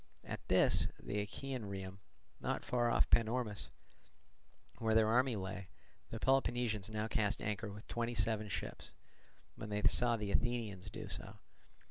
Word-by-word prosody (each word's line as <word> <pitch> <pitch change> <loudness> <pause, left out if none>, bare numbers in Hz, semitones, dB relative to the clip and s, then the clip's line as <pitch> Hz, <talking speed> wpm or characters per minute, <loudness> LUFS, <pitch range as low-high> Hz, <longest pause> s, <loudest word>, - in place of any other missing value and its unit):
At - - -4
this, - - +5
the 105 - -2
Achaean 125 +4 -4
Rhium, 95 0 -6 0.4
not - - -2
far 120 -1 +2
off - - +3
Panormus, 110 - +2 1.1
where 110 -1 +2
their 110 -1 +6
army 125 +1 +4
lay, 95 -1 -4 0.4
the 115 - -5
Peloponnesians 120 -5 +2
now 110 0 -1
cast 110 -2 +1
anchor 105 0 -2
with 105 +2 -10
seventy 120 0 -2
seven 110 -1 +1
ships, - - -5 0.6
when 110 - -6
they 105 0 -1
saw 120 -1 +4
the 105 -2 -3
Athenians 115 -5 0
do - - -6
so. - - -3
110 Hz, 145 wpm, -36 LUFS, 105-120 Hz, 1.1 s, their